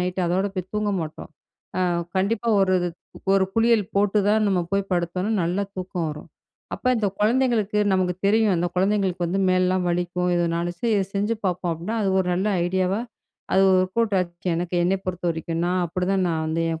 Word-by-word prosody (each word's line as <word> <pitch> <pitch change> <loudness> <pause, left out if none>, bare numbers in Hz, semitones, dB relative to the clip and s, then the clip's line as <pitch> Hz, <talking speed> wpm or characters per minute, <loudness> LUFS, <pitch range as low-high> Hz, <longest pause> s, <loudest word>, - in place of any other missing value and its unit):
Night 180 +1 -2
அதோட 185 +3 +1
போய் 185 -1 -5
தூங்க 210 0 0
மாட்டோம். 155 -1 -7 0.5
அ - - +1 0.4
கண்டிப்பா 210 +4 0
1 190 -1 +3 0.6
1 195 - +4
குளியல் 225 -2 +3
போட்டு 205 +1 +3
தான் 215 +1 +3
நம்ம 190 -3 +2
போய் 195 0 0
படுத்தோம்னா 180 +4 -1
நல்லா 180 +4 0
தூக்கம் 180 -2 -3
வரும். 150 0 -8 0.5
அப்ப - - -8
இந்த 215 -3 0
கொழந்தைங்களுக்கு 220 -2 +2
நமக்கு 185 -1 +1
தெரியும், 215 0 +3
அந்த 175 - 0
கொழந்தைங்களுக்கு 190 -1 +1
வந்து 190 +3 -1
மேல்லாம் 185 0 +2
வலிக்கும். 180 +1 -1
எதனாலச்சும் 170 0 -1
சரி 235 -1 +2
இத 195 - +1
செஞ்சு 205 +3 0
பார்ப்போம். 180 -1 -1
அப்டின்னா 175 +8 -4
அது 195 - +1
1 185 - -2
நல்ல 190 +3 -1 0.2
ஐடியாவா 190 +3 0 0.5
அது 190 - +5
வொர்க் 185 +1 +2
அவுட் 230 -3 +2
ஆச்சு 175 0 -4
எனக்கு 175 +1 -3
என்னை 185 +3 +2
பொறுத்தவரைக்கும். 170 -2 -3
நான் 180 +1 +1
அப்டி 180 +2 -2
தான் 195 -1 +2
நான் 160 -1 -1
வந்து 160 +1 -1
என் 160 0 -3
185 Hz, 180 wpm, -23 LUFS, 175-200 Hz, 0.6 s, அது